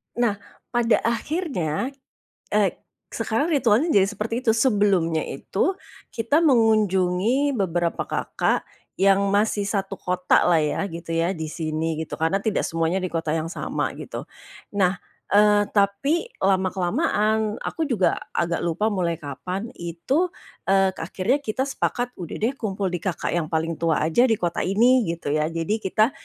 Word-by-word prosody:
Nah, 220 Hz, -4 st, +1 dB, 0.3 s
pada 240 Hz, -2 st, +2 dB
akhirnya, 235 Hz, -, -1 dB, 0.6 s
eee, 205 Hz, -3 st, +2 dB, 0.3 s
sekarang 230 Hz, +8 st, -1 dB
ritualnya 275 Hz, +1 st, +3 dB
jadi 195 Hz, -9 st, +5 dB
seperti 220 Hz, +4 st, -3 dB
itu 225 Hz, -, +5 dB
sebelumnya 200 Hz, -, +2 dB
itu 195 Hz, -, -1 dB, 0.4 s
kita 240 Hz, +8 st, +2 dB
mengunjungi 220 Hz, -, +3 dB
beberapa 175 Hz, -3 st, 0 dB
kakak -, -, 0 dB, 0.4 s
yang 195 Hz, 0 st, +4 dB
masih 205 Hz, 0 st, +2 dB
satu 195 Hz, -1 st, -2 dB
kotalah 180 Hz, -2 st, +2 dB
ya, 150 Hz, +5 st, 0 dB
gitu 165 Hz, 0 st, -5 dB
ya 165 Hz, +3 st, +1 dB
di 160 Hz, -4 st, -4 dB
sini 160 Hz, 0 st, -2 dB
gitu -, -, -8 dB
karena 165 Hz, +4 st, +2 dB
tidak 220 Hz, -, 0 dB
semuanya 165 Hz, +2 st, 0 dB
di 185 Hz, -, -1 dB
kota 165 Hz, -2 st, -2 dB
yang 160 Hz, 0 st, -1 dB
sama -, -, -3 dB
gitu. -, -, -7 dB, 0.5 s
Nah, 190 Hz, -2 st, +2 dB, 0.3 s
eee, 205 Hz, 0 st, +5 dB
tapi 215 Hz, -, +1 dB, 0.2 s
lama 190 Hz, -1 st, +3 dB
kelamaan 215 Hz, -, 0 dB
aku 320 Hz, -2 st, -2 dB
juga 215 Hz, -9 st, +1 dB, 0.2 s
agak 170 Hz, 0 st, 0 dB
lupa 180 Hz, +6 st, 0 dB
mulai 175 Hz, -4 st, 0 dB
kapan 180 Hz, -, -5 dB
itu, 175 Hz, -, 0 dB, 0.4 s
eee, 195 Hz, 0 st, +4 dB
akhirnya 190 Hz, -, 0 dB
kita 260 Hz, -1 st, -2 dB
sepakat 245 Hz, -2 st, -2 dB
udah 175 Hz, -, -6 dB
deh 235 Hz, -, +3 dB
kumpul 195 Hz, -3 st, -2 dB
di 180 Hz, -, -2 dB
kakak 185 Hz, 0 st, -2 dB
yang 170 Hz, -2 st, -1 dB
paling 160 Hz, +1 st, -2 dB
tua 165 Hz, -2 st, +1 dB
aja 165 Hz, +11 st, +3 dB
di 225 Hz, -, +3 dB
kota 175 Hz, -5 st, -2 dB
ini 235 Hz, +4 st, +4 dB
gitu 165 Hz, -3 st, -3 dB
ya, 155 Hz, +1 st, +1 dB
jadi 165 Hz, +7 st, -2 dB
kita 215 Hz, +5 st, +2 dB
195 Hz, 150 wpm, -24 LUFS, 170-225 Hz, 0.6 s, jadi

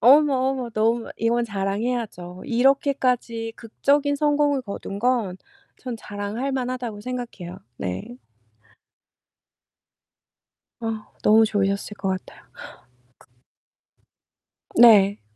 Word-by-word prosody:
어머, 285 Hz, +3 st, +6 dB, 0.2 s
어머 255 Hz, -3 st, -4 dB
너무 225 Hz, +1 st, 0 dB
이건 235 Hz, +1 st, +1 dB
자랑해야죠. 200 Hz, -3 st, -3 dB
이렇게까지 250 Hz, -3 st, +1 dB
극적인 285 Hz, +5 st, +1 dB
성공을 290 Hz, -2 st, +2 dB
거둔 200 Hz, -2 st, -6 dB
건 230 Hz, -5 st, +1 dB, 0.4 s
전 250 Hz, -3 st, -6 dB
자랑할만하다고 240 Hz, +2 st, -4 dB
생각해요. 235 Hz, -7 st, -6 dB, 0.2 s
네. 95 Hz, +6 st, -5 dB, 2.6 s
아, 225 Hz, -2 st, -4 dB, 0.2 s
너무 220 Hz, +1 st, +6 dB
좋으셨을 200 Hz, -1 st, -1 dB
것 195 Hz, -, -3 dB
같아요. 185 Hz, -1 st, -5 dB
극 -, -, -20 dB, 2.2 s
네. 205 Hz, -4 st, +7 dB
230 Hz, 205 characters per minute, -23 LUFS, 205-255 Hz, 2.6 s, 네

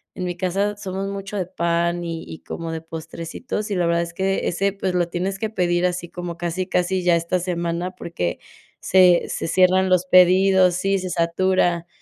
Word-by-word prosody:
en 180 Hz, -, -4 dB
mi 175 Hz, -1 st, -4 dB
casa 195 Hz, +3 st, -1 dB
somos 195 Hz, -1 st, -4 dB
mucho 200 Hz, +1 st, -5 dB
de 185 Hz, -, -1 dB
pan 170 Hz, -1 st, 0 dB
y 165 Hz, -1 st, -5 dB
y 160 Hz, -, -8 dB
como 165 Hz, -1 st, -5 dB
de 160 Hz, -, -4 dB
postrecitos, 165 Hz, +7 st, -6 dB
y -, -, 0 dB
la 175 Hz, -1 st, +1 dB
verdad 170 Hz, 0 st, +2 dB
es 170 Hz, 0 st, -8 dB
que 195 Hz, +2 st, -1 dB
ese, 195 Hz, +3 st, 0 dB
pues 190 Hz, -2 st, -2 dB
lo 175 Hz, -1 st, +1 dB
tienes 190 Hz, +3 st, -3 dB
que 220 Hz, -1 st, -2 dB
pedir 175 Hz, -3 st, +1 dB
así 175 Hz, -1 st, -2 dB
como 175 Hz, -1 st, -6 dB
casi, 175 Hz, +2 st, -3 dB
casi 180 Hz, 0 st, 0 dB
ya 175 Hz, -1 st, +4 dB
esta 170 Hz, +2 st, 0 dB
semana, 175 Hz, 0 st, -2 dB
porque 130 Hz, -, -4 dB, 0.4 s
se 180 Hz, -2 st, +5 dB
se -, -, -3 dB
cierran 185 Hz, +2 st, +3 dB
los 185 Hz, -1 st, +3 dB
pedidos 185 Hz, 0 st, +5 dB
sí, 195 Hz, +1 st, 0 dB
se 185 Hz, 0 st, -5 dB
satura. 175 Hz, 0 st, +1 dB
180 Hz, 195 wpm, -22 LUFS, 170-190 Hz, 0.4 s, se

